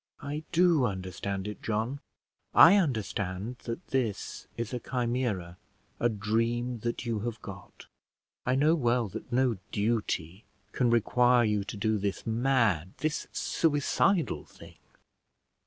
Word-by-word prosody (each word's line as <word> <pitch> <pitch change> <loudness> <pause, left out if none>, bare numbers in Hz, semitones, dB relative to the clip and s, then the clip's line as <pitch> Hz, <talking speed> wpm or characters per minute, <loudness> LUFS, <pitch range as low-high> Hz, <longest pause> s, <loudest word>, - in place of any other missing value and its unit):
"I 145 +1 -3
do 170 -5 +4
understand 95 -1 -3
it, 105 - -7
John. 115 +5 -2 0.6
I 170 +5 +9
understand 110 - -1
that 120 +10 -6
this 120 -7 -2
is 115 +1 -4
a 125 - -1
chimera, 120 -9 -2 0.4
a 120 - +3
dream 115 +3 -1
that 120 +2 -3
you 115 -2 -1
have 115 +1 -4
got. 95 -3 -10 0.6
I 125 - +1
know 150 +4 +4
well 120 -6 +1
that 110 +4 -8
no 125 -3 +2
duty 105 -4 -1 0.3
can 125 -2 +1
require 120 +1 +4
you 105 -2 +1
to 105 - -6
do 110 +1 +1
this 100 0 -3
mad 115 - +1
this 155 -1 -2
suicidal 155 - +1
thing. - - -15
115 Hz, 130 wpm, -29 LUFS, 105-130 Hz, 0.6 s, I